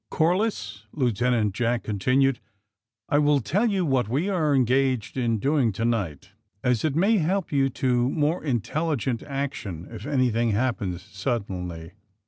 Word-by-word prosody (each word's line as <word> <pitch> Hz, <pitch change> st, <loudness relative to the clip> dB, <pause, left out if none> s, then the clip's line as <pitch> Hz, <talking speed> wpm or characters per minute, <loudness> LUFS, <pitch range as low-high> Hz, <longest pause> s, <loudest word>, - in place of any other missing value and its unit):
*' -, -, -56 dB
Corliss,'^ 160 Hz, -, 0 dB
Lieutenant 120 Hz, -4 st, +1 dB
Jack 120 Hz, +2 st, 0 dB
continued, 130 Hz, +6 st, +1 dB, 0.7 s
*^I 145 Hz, -, +4 dB
will 145 Hz, -1 st, +4 dB
tell 195 Hz, -, +1 dB
you 195 Hz, -4 st, +1 dB
just 150 Hz, -, -1 dB
what 125 Hz, -5 st, +1 dB
we 150 Hz, -, 0 dB
are 155 Hz, -7 st, +2 dB
engaged 130 Hz, -2 st, +1 dB
in 120 Hz, -3 st, +1 dB
doing 135 Hz, 0 st, +2 dB
to 115 Hz, +4 st, -2 dB
night, 100 Hz, -6 st, -2 dB, 0.3 s
as 125 Hz, -3 st, +1 dB
it 155 Hz, -3 st, 0 dB
may 200 Hz, +6 st, +3 dB
hel^D 185 Hz, +2 st, -1 dB
you 135 Hz, -2 st, +2 dB
to 125 Hz, -1 st, +1 dB
more 155 Hz, +4 st, 0 dB
intelligent 135 Hz, -1 st, -1 dB
action 130 Hz, -, -5 dB
if 115 Hz, +4 st, -8 dB
anything 120 Hz, -5 st, +1 dB
happens 105 Hz, -6 st, -1 dB
suddenly. 90 Hz, -9 st, -4 dB
130 Hz, 150 wpm, -25 LUFS, 110-145 Hz, 0.7 s, ^I